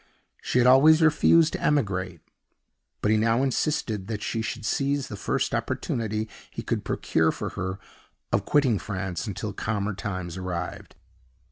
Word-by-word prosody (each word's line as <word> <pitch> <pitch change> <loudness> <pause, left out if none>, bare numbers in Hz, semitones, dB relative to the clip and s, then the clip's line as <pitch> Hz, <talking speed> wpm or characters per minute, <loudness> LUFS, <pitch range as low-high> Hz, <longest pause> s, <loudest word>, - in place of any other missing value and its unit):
She - - -1
had 125 - +5
always 140 +5 +7
refused 160 +1 +5
to - - -4
emigrate; 95 - 0 0.8
but 105 - +3
he 110 - +4
now 115 +4 +2
insisted 125 -7 -1
that 105 -2 -4
she 115 - -2
should 110 - -4
seize 140 +5 0
the 105 - -5
first - - -1
opportunity 110 -1 -2 0.2
he - - -7
could - - -2
procure 80 0 +1
for - - -4
her 95 0 -4 0.6
of 100 - +2
quitting 130 -5 +2
France 95 -4 -4
until - - -4
calmer 105 -1 -2
times 90 -3 -5
arrived. 90 -1 -5
110 Hz, 150 wpm, -26 LUFS, 95-130 Hz, 0.8 s, always